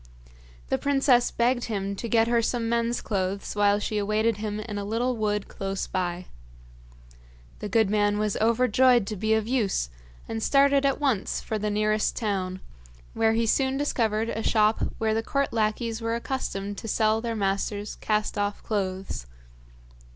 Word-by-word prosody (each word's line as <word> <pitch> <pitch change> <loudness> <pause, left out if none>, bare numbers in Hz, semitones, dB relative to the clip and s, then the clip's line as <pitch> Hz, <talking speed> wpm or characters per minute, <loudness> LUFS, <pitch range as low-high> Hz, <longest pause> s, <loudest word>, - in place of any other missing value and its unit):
The - - +1
princess 270 -3 +3
begged 240 +1 +1
him 200 -3 -3
to 235 - -4
get 225 0 +3
her 235 0 +3
some 230 0 -1
men's 235 +1 0
clothes 195 -1 -2
while 205 0 +4
she 210 0 -2
awaited 215 +2 +1
him 210 0 -3
in 210 -1 -5
a - - -3
little 235 +5 -1
wood 210 -2 -1
close 195 0 -4
by. 180 -1 -3 1.3
The 210 - -5
good 220 +1 +3
man 205 0 +2
was 210 -1 0
overjoyed 240 +1 +4
to 215 - -4
be 220 +3 +1
of 220 -1 -1
use, 205 - 0 0.4
and 225 0 -4
started 275 +2 +4
at 275 - 0
once 265 -9 0
for 220 - -3
the 210 +1 -1
nearest 215 +1 +1
town, 190 -4 -2 0.5
where 225 0 +2
he 230 +1 +1
soon 265 +4 +1
discovered 225 -6 0
a 225 - -3
shop 215 -1 +2
where 220 -1 +1
the 225 - +1
court 275 +3 -1
lackeys 225 +1 -1
were 230 0 -1
accustomed 205 -5 -3
to - - -7
sell 220 +1 +2
their 230 -1 -3
masters' 200 0 -1
cast 210 -1 -1
off 205 0 -2
clothes. 190 - -3
220 Hz, 165 wpm, -26 LUFS, 205-235 Hz, 1.3 s, while